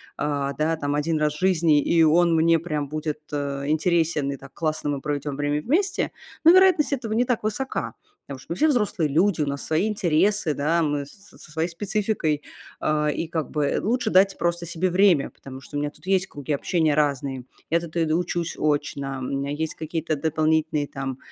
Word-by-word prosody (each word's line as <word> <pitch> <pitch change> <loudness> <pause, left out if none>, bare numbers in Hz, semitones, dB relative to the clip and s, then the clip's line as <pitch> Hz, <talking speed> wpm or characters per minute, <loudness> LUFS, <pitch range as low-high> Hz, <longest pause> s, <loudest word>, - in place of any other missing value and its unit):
а, 140 -1 -1
да, 155 +3 0
там 145 -2 -2
1 150 +2 0
раз 150 -1 +1
в 150 - -10
жизни, 165 -5 +3
и 165 +2 +3
он 165 +2 +4
мне 165 +1 +4
прям 155 -3 -3
будет, 155 +1 -4
э, 140 -1 -3
интересен, 160 -2 +1
и 140 - -5
так 135 0 -14
классно 155 -2 -2
мы 140 -1 -3
проведем 145 -1 -3
время 145 +1 0
вместе, 345 - 0 0.3
ну, 330 +2 +8
вероятность 370 -6 +5
этого 235 -5 -3
не 240 +3 +2
так 245 -2 0
высока. 220 +5 -3 0.3
Потому 135 -2 -7
что - - -13
мы - - -1
все 310 - +4
взрослые 210 - +1
люди, 170 +4 +2
у 145 - 0
нас 140 0 -4
свои 160 +6 +1
интересы, 200 -3 +1
да, 160 +4 +1
мы 145 -2 -1
со 200 +6 -18
своей 160 +2 -1
спецификой. 185 -4 -1 0.4
А, 150 0 +1
и 155 +2 -1
как 160 -4 -3
бы 150 -2 0
лучше 230 +1 0
дать 195 +1 +4
просто 170 0 -1
себе 175 +2 -1
время, 180 -5 +4
потому 135 -1 -11
что 145 - -7
у - - 0
меня 145 0 -1
тут 150 +3 -20
есть 190 0 +1
круги 145 -2 -4
общения 160 +1 +1
разные. 140 -3 -1 0.3
Я 170 - +4
тут 170 0 -7
иду 165 0 +2
учусь 175 -1 -2
очно, 145 -2 -1
у 130 - -6
меня 140 +2 -2
есть 155 +2 -2
какие-то 160 0 -3
дополнительные, 155 0 +1
там, 135 -2 -5
155 Hz, 200 wpm, -24 LUFS, 145-175 Hz, 0.4 s, ну